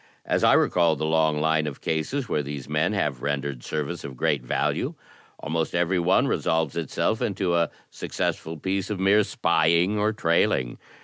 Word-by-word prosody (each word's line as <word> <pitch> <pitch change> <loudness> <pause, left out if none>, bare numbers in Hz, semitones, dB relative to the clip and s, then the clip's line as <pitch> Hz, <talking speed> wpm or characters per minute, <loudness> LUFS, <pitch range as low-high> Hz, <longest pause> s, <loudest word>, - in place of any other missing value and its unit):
As - - 0
I - - +6
recall 85 -3 +3
the 80 - -3
long 80 -1 +2
line 80 0 +1
of 70 - -6
cases 115 - -2
where 75 - 0
these 70 -2 -6
men 75 +7 0
have 75 -11 -1
rendered 70 -3 -3
service 80 +2 -4
of 65 -2 -8
great 70 +2 +1
value, - - -1 0.4
almost 80 +2 -2
every 90 +1 +1
one 90 +2 +3
resolves 80 -3 0
itself 85 +6 -1
into 95 -3 0
a 85 -1 +2 0.2
successful 80 +1 -3
piece 95 +4 -2
of 105 -3 -3
mere 100 +3 +4
spying 85 +4 +2
or 105 +1 +2
trailing. 80 - +1
80 Hz, 170 wpm, -25 LUFS, 75-95 Hz, 0.4 s, I